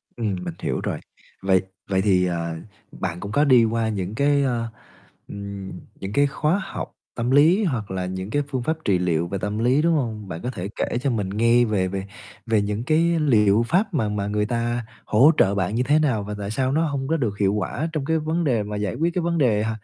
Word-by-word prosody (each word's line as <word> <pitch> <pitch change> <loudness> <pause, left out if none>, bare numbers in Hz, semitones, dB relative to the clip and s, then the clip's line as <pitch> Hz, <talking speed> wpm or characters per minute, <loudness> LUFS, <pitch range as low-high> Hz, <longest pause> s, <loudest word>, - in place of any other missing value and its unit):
Ừm, 110 -5 -1
mình 85 -2 -4
hiểu - - -2
rồi. - - -2 0.4
Vậy 95 -1 +3 0.3
vậy 95 -1 +2
thì, 95 -3 +3
ờ, 85 -2 -2 0.4
bạn 90 -1 -4
cũng 100 +2 -6
có 145 +5 +3
đi 125 -4 +6
qua 115 0 0
những 100 0 -3
cái, 140 +1 +3
ơ, 120 -3 -1 0.6
ừm, 100 -1 -7 0.3
những 95 +2 -5
cái 145 +3 +4
khóa 155 +7 0
học - - -6 0.2
tâm 120 +2 -1
lý 165 +9 +5
hoặc 115 - -2
là 95 -1 -2
những 95 +2 -5
cái 145 +5 +1
phương 130 -3 -2
pháp 160 +3 -1
trị 95 -3 +3
liệu 85 -1 0
về 100 - -3
tâm 105 +3 -3
lý, 130 +5 +3
đúng 165 0 +3
hông? 110 -7 -2
Bạn 85 -2 -6
có 125 - -3
thể 95 -3 -5
kể - - -1
cho 140 - +1
mình 105 -5 -1
nghe 115 +4 +3
về 100 -4 0
về 95 +1 -4 0.4
về 110 -2 +2
những 105 +2 -2
cái 165 +4 +2
liệu 110 -7 +4
pháp 195 +3 +1
mà 110 -8 +1
mà 100 -1 -2
người 105 0 0
ta 120 0 -1 0.2
hỗ 130 +9 +6
trợ 100 0 +3
bạn 100 +2 -1
như 125 - +2
thế 145 +4 +3
nào? 125 -9 +1
Và 105 +1 -5
tại 100 +1 -4
sao 130 +3 0
nó 160 +3 +2
hông 140 -3 -2
có 165 - +1
được 110 -8 -2
hiệu 100 -1 +2
quả 105 - -2
trong 150 -3 -2
cái 160 +2 +1
vấn 160 +3 -1
đề 120 -8 +1
mà 105 0 -5
giải 105 -3 -2
quyết 170 +2 0
cái 180 - 0
vấn 170 0 0
đề 110 -7 +3
h 110 - -1
110 Hz, 240 wpm, -23 LUFS, 100-140 Hz, 0.6 s, đi